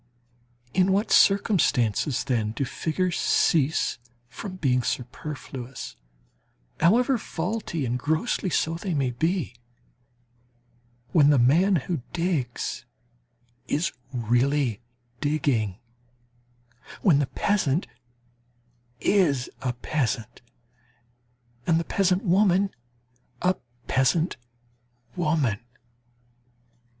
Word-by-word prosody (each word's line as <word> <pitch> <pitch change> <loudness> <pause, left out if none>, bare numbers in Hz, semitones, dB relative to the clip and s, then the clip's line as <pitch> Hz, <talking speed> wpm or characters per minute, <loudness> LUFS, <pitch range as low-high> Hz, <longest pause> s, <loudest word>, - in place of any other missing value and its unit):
In 185 +1 +3
what 205 +4 0
circumstances, 145 - +3
then, 115 -5 -1
do 135 - -2
figures 170 +7 -1
cease 155 -5 +2 0.3
from 185 - -7
being 130 -8 +1
superfluous, 130 0 -5 0.8
however 240 - +4
faulty, 175 -5 -3
and 125 +1 -1
grossly 160 - 0
so, 160 -1 +1
they 170 +1 -3
may 135 -3 +1
be? 160 +4 -1 1.6
When 145 -4 +5
the 145 - +5
man 165 +11 +4
who 165 -1 -2
digs 165 -13 -2 0.8
is 155 +4 0 0.2
really 125 0 +1 0.4
digging, 135 -10 0 1.3
when 165 -9 +5
the 145 - +1
peasant 185 -5 0 1.1
is 150 - +2
a 125 - 0
peasant, 120 -2 -3 1.3
and 165 -1 +4
the - - -1
peasant 185 +1 +1
woman 195 0 +3 0.7
a 180 +1 +4 0.3
peasant 145 +7 +2 0.8
woman. 150 - +1
150 Hz, 85 wpm, -25 LUFS, 125-180 Hz, 1.6 s, When